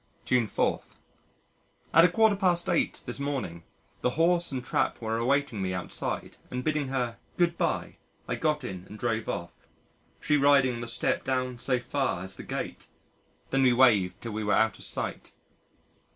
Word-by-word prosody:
June 125 -3 +2
4. - - 0 1.1
At 165 - +8
a - - +7
quarter 220 +2 +4
past 180 -3 +1
eight, 170 - 0
this 120 +2 -3
morning, 135 -12 -3 0.4
the - - +2
horse 170 0 +3
and 130 -2 -4
trap - - 0
were 110 -1 -2
awaiting 125 -1 +1
me 95 -1 -1
outside, 90 - -4
and 125 0 -4
bidding 155 -1 0
her 125 -3 -2 0.2
"Goodbye" 170 -1 0 0.3
I - - -1
got 150 -3 0
in 95 -7 -6
and 105 - -9
drove 115 -1 -1
off 85 0 -4 0.7
she 150 0 +2
riding 140 -2 +5
on 120 - -5
the 120 - -5
step 115 - 0
down 130 -2 -1
so 125 +1 +1
far, 125 -6 -1
as 95 0 -7
the - - -8
gate. - - -5 0.6
Then 135 - +3
we 130 -2 +5
waved 110 -8 +4
till 115 - -4
we 110 +1 -3
were 105 -1 +2
out 110 -2 +2
of - - -5
sight. - - -4
125 Hz, 175 wpm, -28 LUFS, 110-145 Hz, 1.1 s, At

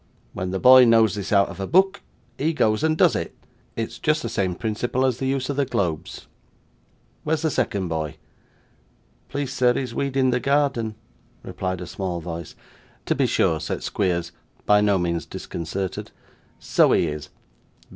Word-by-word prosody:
When 95 0 -3
the 95 - -2
boy 130 +2 +8
knows 115 -2 +4
this 100 -2 -5
out 100 -1 +4
of 95 +3 -6
book, 190 +3 +3 0.3
he 160 +4 0
goes 110 -2 +1
and 160 0 +2
does - - +4
it. - - -4 0.4
It's 115 +1 -4
just 155 0 +1
the - - -3
same 95 -5 -1
principle 120 +5 -1
as 125 -2 0
the 135 - -1
use 135 -1 -1
of 140 - -3
the 140 - +3
globes. 90 - -3 1.0
Where's 155 0 -1
the 160 - +1
second 100 -7 -1
boy?' 80 -3 -3 1.1
'Please, 140 -2 -3
sir, 125 -2 +3
he's 125 -3 -3
weeding 135 -1 +1
the 125 - +1
garden,' 135 -6 0 0.5
replied 95 -1 -4
a - - -5
small 90 0 -4
voice. 85 -1 -7 0.5
'To - - +1
be - - +1
sure,' 80 - +1
said 80 - -4
Squeers, 90 -3 -1 0.3
by 105 0 +5
no 100 -1 +3
means 85 -2 -2
disconcerted. 90 +3 -5 0.5
'So - - +3
he - - +3
is. 75 -1 -5
110 Hz, 165 wpm, -23 LUFS, 90-135 Hz, 1.1 s, boy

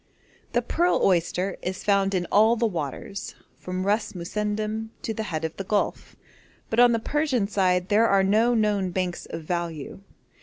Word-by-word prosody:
The 240 - +2
pearl 345 +8 +1
oyster 180 +1 +1
is 185 +1 -4
found 200 -1 +2
in 180 -1 0
all 220 +3 +5
the 235 0 0
waters 175 - -4 0.2
from 185 +1 -4
Ras 210 +2 0
Mussendom 210 +4 -3
to 225 - -2
the 220 - -4
head 160 -1 -2
of 160 - -5
the 195 - -3
Gulf, 205 +2 -2 0.6
but 225 - +1
on 245 0 +7
the 230 - +2
Persian 260 -3 0
side 185 -3 +1
there 220 +3 +4
are 195 -2 +4
no 220 +5 +3
known 205 -4 +1
banks 180 -1 -3
of 165 0 -6
value. 170 -1 -4
200 Hz, 175 wpm, -25 LUFS, 180-220 Hz, 0.6 s, on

